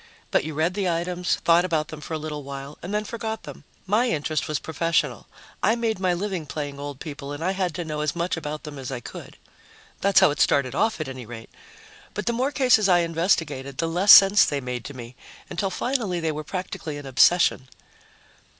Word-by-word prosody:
But - - +3
you 155 0 -5
read 160 +4 +1
the 195 -2 -1
items, 175 +1 0
thought 170 +1 +5
about 160 -4 -1
them 155 -1 -8
for 160 - -5
a - - -1
little 150 -1 -5
while, 140 +1 -8
and 180 - -6
then 210 0 0
forgot 220 0 -5
them. - - -11 0.2
My 220 +6 +2
interest 155 -3 -1
was 155 - -1
professional; 165 +2 -1 0.3
I 220 - +3
made 230 -4 -1
my 185 -1 +1
living 180 -3 -3
playing 145 -2 -5
old 145 -1 -6
people 145 -2 -7
and 145 +2 -5
I 185 - +1
had 185 -4 -2
to 175 -1 -4
know 150 -1 -3
as 150 +1 -1
much 170 +1 -1
about 155 -2 -5
them 150 -3 -8
as 130 0 -6
I 130 - -3
could. - - -10 0.6
That's 200 0 +4
how - - +5
it 150 - -5
started 130 -3 +2
off, 220 +7 +1
at 155 - -3
any 130 -3 -8
rate. 115 -1 -10 0.6
But 210 - -3
the 235 - +1
more 255 +4 0
cases 250 -8 +4
I 175 -1 +5
investigated, 165 -5 -1
the 165 - 0
less 180 +5 +4
sense 195 +1 +9
they 145 -4 0
made 125 -2 -5
to 145 - -8
me, 120 0 -9 0.4
until 195 +3 -1
finally 215 -3 -1
they 160 -1 -1
were 155 0 -5
practically 165 -3 -5
an 145 - -9
obsession. 135 0 +3
165 Hz, 215 wpm, -24 LUFS, 145-190 Hz, 0.6 s, sense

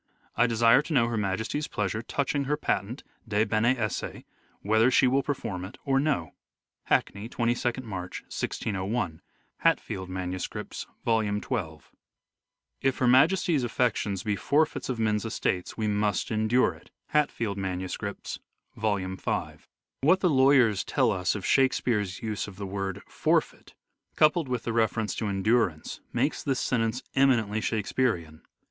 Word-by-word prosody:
I 120 +2 +4
desire 115 +3 +5
to 155 +2 -5
know 125 -5 +4
Her 115 - -2
Majesty's 110 +8 -1
pleasure 105 +1 -2
touching 140 +3 -1
her 150 +2 0
patent 115 -3 -2 0.2
(de 105 -1 +2
bene 115 +4 +2
esse) 110 -3 -2 0.6
whether 110 +4 +4
she 130 - +4
will 130 +2 +3
perform 125 -10 -3
it 95 +7 -9
or 135 -1 +3
no." 135 - 0 0.5
Hackney, 100 +3 0
22nd 120 +1 -1
March, 95 -5 -6
1601. 95 -4 -3 0.4
(Hatfield 95 -1 0
MSS., 95 0 -5 0.2
Vol. 115 -1 +3
XII.) 105 - -3 0.5
" - - -58
If 130 - -5
Her 130 - +1
Majesty's 160 +3 +4
affections 110 -5 0
be 105 -2 0
forfeits 150 +9 +1
of 125 - -1
men's 105 -2 +1
estates 95 -5 -2
we 110 -1 -1
must 105 -1 0
endure 110 +3 +2
it." - - -18 0.2
(Hatfield 115 -9 0
MSS., 95 +2 -4 0.4
Vol. 105 -1 +1
V.) 95 0 -3 0.4
What 170 +7 +4
the 180 - +3
lawyers 130 -7 +4
tell 130 -5 +2
us 90 -1 0
of 100 - -5
Shakespeare's 115 -8 +1
use 110 -2 -2
of 100 - -10
the 100 +1 -6
word 95 0 -4
" - - -34 0.2
forfeit," - - +1 0.4
coupled 155 -1 +3
with 125 -2 -2
the 115 - -2
reference 110 -1 +1
to 110 - -1
en 95 -1 -2
durance, 105 -9 +1
makes - - 0
this 135 -2 -1
sentence 115 0 0
eminently 115 -6 +3
Shakespearean. 105 -8 -1
110 Hz, 150 wpm, -27 LUFS, 100-130 Hz, 0.6 s, desire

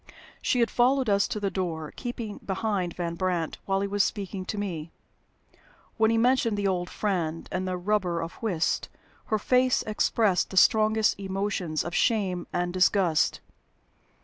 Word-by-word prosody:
She 250 - +1
had 230 - +2
followed 255 -1 +3
us 200 0 +3
to 210 - -3
the 200 -1 -1
door, 165 -5 -3
keeping 235 -4 -5
behind 190 -3 -2
Van 170 -1 -3
Brandt 170 -2 -2
while 195 0 0
he 200 - 0
was 200 0 +2
speaking 195 -2 -3
to 210 - -4
me. 170 -6 -4 1.1
When 220 -1 +4
he 230 - +2
mentioned 235 -2 +2
the 200 -1 0
"old 180 -2 -1
friend" 170 -6 -2
and 185 0 -2
the 185 -1 -2
"rubber 180 -2 0
of 165 +1 -5
whist," 180 -8 0 0.4
her 215 - 0
face 250 +4 +2
expressed 215 -2 +1
the 190 - -6
strongest 215 +1 +4
emotions 195 -4 -2
of 170 - -6
shame 190 -6 +1
and 175 0 -1
disgust. 185 -3 +2
195 Hz, 160 wpm, -27 LUFS, 175-215 Hz, 1.1 s, When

